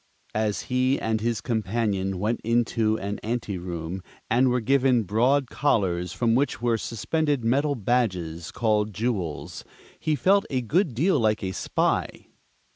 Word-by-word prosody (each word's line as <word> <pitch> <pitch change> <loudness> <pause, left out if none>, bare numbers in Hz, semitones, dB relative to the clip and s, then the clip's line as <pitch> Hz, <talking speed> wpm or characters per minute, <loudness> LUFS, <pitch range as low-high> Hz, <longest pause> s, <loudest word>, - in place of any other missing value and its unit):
As 105 -1 0
he 130 +1 +1
and 110 -1 -1
his 115 -1 -1
companion 105 -4 -1
went 105 +5 -1
into 115 -1 +1
an 100 0 -4
anteroom 95 -6 -4 0.3
and 125 +3 +4
were 125 0 +2
given 130 0 +3
broad 125 +7 +2
collars 95 - +1
from 115 +4 +1
which 135 +4 +1
were 115 -1 +1
suspended 145 +4 -1
metal 140 +5 +2
badges 95 -9 -1
called 105 -3 0
"jewels," 105 -9 -3 0.4
he 155 -1 0
felt 195 +6 +3
a 130 -2 0
good 160 - +1
deal 160 +4 +2
like 110 -2 +1
a 95 - -2
spy. - - -1
115 Hz, 140 wpm, -25 LUFS, 100-125 Hz, 0.4 s, and